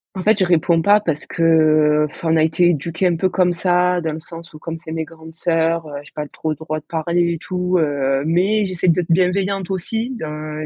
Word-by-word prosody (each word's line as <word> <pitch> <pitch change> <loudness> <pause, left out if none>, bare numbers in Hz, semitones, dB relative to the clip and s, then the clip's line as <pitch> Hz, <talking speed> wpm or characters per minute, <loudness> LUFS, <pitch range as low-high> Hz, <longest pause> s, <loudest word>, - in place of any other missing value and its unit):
En 185 - -4
fait, 215 0 +3
je 190 - +3
réponds 170 -1 +2
pas 205 +5 +5
parce 160 -7 -3
que, - - -6 0.6
heu, - - 0
enfin, 160 -1 -2
on - - +4
a 155 - +3
été 160 +2 +3
éduquées 170 +3 0
un 175 - +1
peu 185 +3 0
comme 180 -1 +2
ça 180 0 +1
dans 160 -1 -2
le 155 - -5
sens 165 +1 -11
où 155 - -11
comme 165 0 -6
c'est 160 -1 -10
mes 160 0 -3
grandes 160 0 -14
sœurs, 165 -1 0
heu, 145 -1 -6
j'ai 145 - -17
pas 150 -1 -5
trop 155 - -5
le 155 - -2
droit 155 0 -4
de - - -45
parler 170 +1 0
et 165 - -4
tout, 180 +1 -1
heu, 140 -3 0
mais 190 +6 +2
j'essaie 185 -1 -1
d'être 170 0 +1
bienveillante 190 +2 +1
aussi, 220 +6 -2
d'un 155 -6 -6
165 Hz, 240 wpm, -19 LUFS, 160-180 Hz, 0.6 s, pas